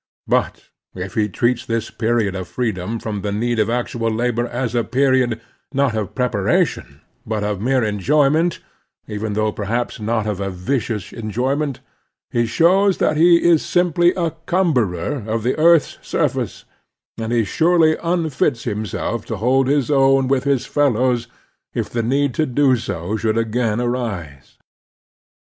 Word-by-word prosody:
But - - -1 0.2
if 95 0 -6
he 105 -1 0
treats 120 +4 0
this 115 -1 -3
period 115 -3 0
of 95 -2 -5
freedom 110 -3 -2
from 105 -3 -4
the 105 - -3
need 115 +3 -1
of 110 - +2
actual 120 -1 -1
labor 120 +1 0
as 120 -1 -3
a 120 -1 +1
period, 130 -2 +1 0.4
not 135 -4 +2
of 105 -4 -3
prepara 120 -7 +2
tion, - - -10 0.2
but 110 -1 -3
of 105 -2 -2
mere 130 +1 +2
enjoyment, 145 - +2 0.5
even 105 0 -3
though 110 +1 0
perhaps 115 +5 -3
not 110 0 -1
of 105 -3 -2 0.2
vicious 105 0 -3
enjoyment, 130 +6 -2 0.5
he 120 -1 +1
shows 185 - +3
that 155 - +1
he 170 +2 +5
is 165 -3 +4
sim 175 -2 +1
ply 175 +1 +4
a 170 -2 0 0.2
cumberer 130 - 0
of 110 0 -1
the 125 - +1
earth's 165 -2 +4
surface, - - -2 0.5
and 110 0 -3
he 120 -1 +2
surely 160 - +3
unfits 160 -8 0
himself 110 0 -3
to 110 - -3
hold 130 +5 +2
his 145 0 +1
own 135 -1 +4
with 135 0 +1
his 140 -3 +1
fellows 125 -4 +1 0.5
if - - -2
the 120 - -1
need 135 +3 +1
to 155 -2 0
do 130 +1 +3
so 100 -3 -4
should 110 +1 0
again 115 0 0
arise. 100 - -4
120 Hz, 155 wpm, -20 LUFS, 110-140 Hz, 0.5 s, he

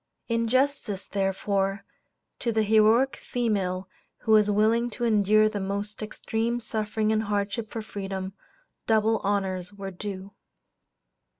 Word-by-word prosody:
In 230 -1 0
justice, 255 -5 0
therefore, 195 0 -1 0.5
to 235 - 0
the 220 -1 +2
heroic 220 +5 +4
female 195 -6 -1 0.3
who 220 - -1
was 210 -1 +6
willing 220 +3 +3
to 240 +1 -5
endure 215 -1 +4
the 215 -1 -3
most 200 +2 -4
extreme 225 +2 -2
suffering 215 -1 -1
and 215 0 +2
hardship 210 +1 -2
for 225 - -5
freedom, 195 -2 -5 0.5
double 220 0 +3
honors 190 -2 -1
were 195 -1 -6
due. 195 +1 -7
210 Hz, 125 wpm, -27 LUFS, 195-225 Hz, 0.5 s, was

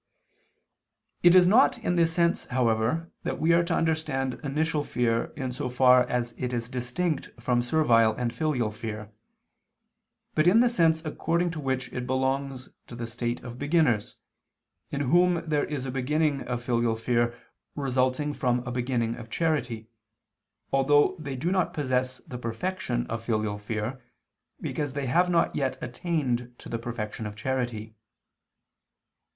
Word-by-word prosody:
It 175 +1 +7
is 180 -1 +8
not 225 +7 +5
in 220 -7 -1
this 165 -1 +3
sense, 170 0 +1
however, 125 +6 0
that - - -3
we 165 +1 +3
are 170 0 +4
to - - 0
understand 155 -5 0
initial 150 +2 0
fear 115 -4 0
in 130 -3 -3
so 125 +1 -4
far 125 0 +5
as 120 -1 -1
it 125 0 -2
is 120 -1 -3
distinct 130 +6 -2
from 120 0 +1
servile 120 -4 +3
and 120 -1 -2
filial 135 -9 0
fear, 110 0 -6 1.2
but 155 +2 +3
in 200 +6 +6
the 245 0 +5
sense 165 -8 +2
according 170 +3 0
to 165 - -6
which 130 -2 -2
it 125 -1 -4
belongs 130 0 -1 0.2
to 120 - -9
the 120 0 -4
state 120 +1 -3
of 120 0 -8
beginners, 145 -8 +1 0.7
in 140 - -2
whom 170 +4 +3
there 150 -2 +1
is 140 -3 -4
a 130 - -3
beginning 140 +2 0
of 120 -1 -3
filial 120 -2 +1
fear 120 +1 0 0.4
resulting 135 +1 0
from 125 -2 0
a 125 - -4
beginning 120 -2 -1
of 115 -2 -10
charity, 125 -7 -1 0.9
although 145 +6 +4
they 140 -3 -5
do 165 +8 -1
not 185 -3 0
possess 130 -3 0
the 125 - -7
perfection 120 +1 -2
of 115 0 -5
filial 110 -2 -1
fear, 110 +4 -4 0.6
because 145 -3 -3
they 140 -1 -2
have 175 +8 +3
not 170 -1 +2
yet 135 -2 -1
attained 125 -3 -2
to - - -11
the 115 - -3
perfection 115 -2 -5
of 105 - -8
charity. 120 -2 -3
130 Hz, 155 wpm, -27 LUFS, 120-155 Hz, 1.2 s, is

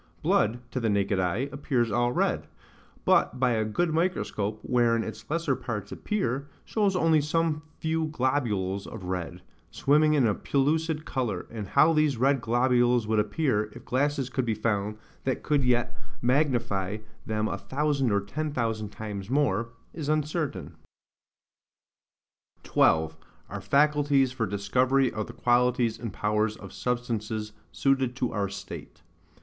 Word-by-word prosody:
Blood, 115 +3 +2
to 130 - -2
the 115 -2 0
naked 100 -1 +1
eye, 95 +9 0
appears 125 -5 0
all 120 +3 +2
red; - - 0 0.6
but 125 - +3
by 125 -1 +3
a 110 -2 +1
good 155 +10 0
microscope, 110 - -1
wherein 120 -2 +2
its - - -8
lesser 160 -3 0
parts 115 -5 -5
appear, 140 - -2 0.2
shows 205 -3 +1
only 165 -3 +4
some 155 +1 0 0.2
few 160 0 -1
globules 115 -10 -1
of 110 -4 -8
red, 90 -1 -4 0.3
swimming 150 +2 +3
in 135 -4 +4
a 105 - +3
pellucid 155 +5 0
liquor, 115 -9 -2
and 110 -3 -5
how 160 +10 +5
these 155 -4 +2
red 135 +2 +2
globules 120 0 +3
would 110 0 +1
appear, 110 -2 +1
if - - -12
glasses 140 0 0
could 130 - 0
be 115 -2 0
found 105 -1 -1 0.3
that 130 - -1
could 145 -2 +2
yet 120 -1 +1 0.2
magnify 120 -7 +1 0.3
them 110 0 0
a - - -3
thousand 140 -3 0
or 100 0 +2
ten 150 +10 -4
thousand 115 -5 -2
times 105 -2 -6
more, 120 -5 +1 0.2
is 155 -3 -4
uncertain. 150 - -1 1.9
12. 80 0 +2 0.3
Our - - -5
Faculties 145 -2 +3
for 115 -4 -2
Discovery 125 +7 +2
of 110 -1 -3
the - - -9
Qualities 120 -2 +2
and 115 -3 -5
powers 105 +2 0
of 100 -3 -11
Substances 110 -3 -2 0.2
suited 135 -2 +1
to 125 -3 -1
our 100 -2 -1
State. 100 0 -9
120 Hz, 145 wpm, -27 LUFS, 105-145 Hz, 1.9 s, how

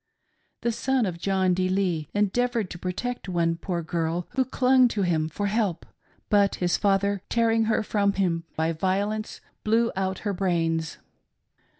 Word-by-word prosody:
The 235 - +1
son 260 +1 0
of 175 -3 -4
John 190 0 +1
D. 185 +1 0
Lee 180 -6 0
endeavored 220 +1 +1
to 170 - -7
protect 190 +6 -4
one 170 -2 +1
poor 170 0 -3
girl 165 +1 -2
who 260 +1 +2
clung 255 0 +4
to 210 -4 -1
him 160 -3 +1
for 205 +6 -3
help; 200 -4 0 0.4
but 200 -1 +3
his 175 -1 +1
father, 200 0 +1
tearing 225 -1 +2
her 220 0 +1
from 200 -1 +1
him 175 -4 0
by 160 +1 +1
violence, 200 +5 -2 0.2
blew 230 +2 +2
out 190 0 -1
her 205 - 0
brains. 165 -4 -1
195 Hz, 160 wpm, -26 LUFS, 175-220 Hz, 0.4 s, clung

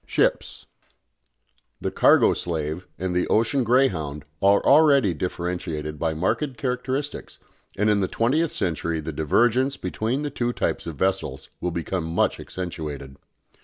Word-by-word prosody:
SHIPS. - - 0 1.1
The - - -3
"cargo - - +5
slave" 80 +1 -3
and 90 -1 -2
the 90 - +1
"ocean 115 +5 +2
greyhound" 80 - +1 0.2
are 100 +1 +4
already 140 - +5
differentiated 85 -3 -4
by 80 0 -1
marked 115 - -1
characteristics, 130 +2 -3 0.4
and 105 +2 +2
in 105 -1 +3
the 95 - +1
twentieth 145 - +1
century 85 -2 -2
the 80 +1 -5
divergence 120 - +2
between 110 +9 -2
the 145 - -3
two 120 -2 -1
types - - -2
of 80 - -5
vessels 75 -6 -2
will 90 - -1
become 85 +1 -3
much 80 +1 0
accentuated. 75 -7 -6
95 Hz, 135 wpm, -24 LUFS, 80-125 Hz, 1.1 s, cargo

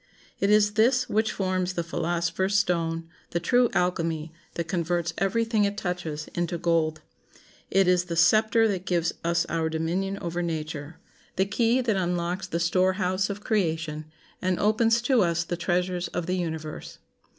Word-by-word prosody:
It 200 - +2
is 210 0 +4
this 250 +4 +3
which 220 +1 +1
forms 185 -1 -1
the 170 - -2
philosopher's 170 +4 0
stone, 165 -4 0 0.2
the 170 - -1
true 245 +7 +3
alchemy, 165 -3 -1 0.2
that 170 -1 -3
converts 170 -1 -1
every 220 +5 +1
thing 225 -2 +1
it 200 0 0
touches 165 -4 -4
into 175 0 -1
gold. 165 -2 0 0.7
It 195 -1 +3
is 180 0 +3
the 170 -1 -4
scepter 220 +6 +4
that 190 -2 -3
gives 170 -2 +1
us 170 0 +1
our 165 -1 -1
dominion 175 +5 -1
over 175 -1 -3
nature; 160 -2 -4 0.4
the 190 - +2
key 230 +5 +2
that 225 -5 0
unlocks 180 +1 -1
the 170 -2 -2
storehouse 185 +2 +1
of 200 +1 -5
creation, 160 -7 -1 0.4
and 185 -1 0
opens 225 +2 +3
to 250 -2 +3
us 170 -2 +1
the 175 - -3
treasures 180 0 -1
of 175 - -4
the 180 +2 -1
universe. 160 -3 -5
180 Hz, 160 wpm, -26 LUFS, 170-200 Hz, 0.7 s, is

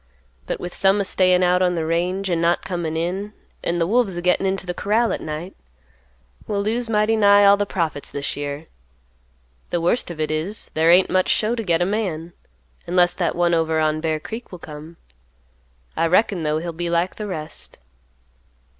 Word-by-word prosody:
But - - -3
with 175 0 -6
some 195 +1 +3
a 200 - 0
stayin' 185 -1 +3
out 180 0 +3
on 180 -1 +2
the 165 -1 -1
range, 180 +4 -1
an' 165 -1 +1
not 170 +1 +1
comin' 170 -3 -3
in, 190 +5 -3 0.3
an' 170 - -1
the 170 - +1
wolves 205 -2 +1
a - - -3
gettin' 180 +2 +2
into 190 0 -2
the 180 - -3
corral 220 +5 +1
at - - -4
night, 155 +4 -6 0.9
we'll 200 -1 -1
lose 230 +3 -1
mighty 215 0 +2
nigh 205 -1 +6
all 200 0 +7
the 205 0 -2
profits 160 -7 -2
this 140 0 -3
year. 145 +2 -5 1.0
The 175 - 0
worst 175 +8 +1
of 170 -2 -8
it 155 0 -1
is, 165 +8 -3
there 160 +1 +3
ain't 180 +2 +5
much 185 0 +2
show 220 +2 +2
to 235 - -2
get 175 -3 +2
a - - +1
man; 180 -5 -3 0.5
unless 175 0 +3
that 175 - -1
one 175 0 +2
over 160 -1 +1
on 155 0 +1
Bear 160 -1 -1
Creek 225 +9 -8
will 180 - -7
come. 155 0 -11 1.0
I 165 - +1
reckon, 185 +1 +2
though, 155 0 0
he'll 170 +1 -4
be 170 +1 -3
like 170 +2 0
the 210 - -5
rest." 155 -5 -7
175 Hz, 200 wpm, -22 LUFS, 165-200 Hz, 1.0 s, all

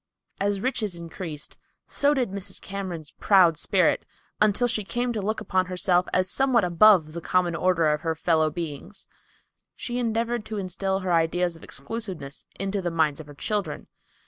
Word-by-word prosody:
As 200 0 0
riches 220 -7 -1
increased, 165 -2 -7 0.3
so 285 +1 +2
did 250 -7 0
Mrs. 200 -1 -4
Cameron's 185 -6 -6
proud 185 -5 +5
spirit, - - +2 0.4
until 215 +3 +4
she 220 -3 -1
came 240 +4 -2
to 215 - -2
look 215 +3 -1
upon 185 -1 0
herself 180 0 +1
as 185 0 +2
somewhat 255 +2 +2
above 175 -2 +5
the 170 - -5
common 175 0 +1
order 180 -1 +2
of 150 - -3
her 165 -1 -1
fellow 160 -1 +2
beings. 165 +3 -6 0.7
She 245 0 -4
endeavored 230 0 -1
to 215 - -5
instil 190 0 -2
her 185 -1 0
ideas 170 +1 +1
of 165 - -15
exclusiveness 175 -3 -5
into 195 +1 -1
the 175 - -1
minds 160 -3 +1
of 155 - -9
her 145 - -12
children. 205 +7 -2
185 Hz, 170 wpm, -25 LUFS, 165-215 Hz, 0.7 s, proud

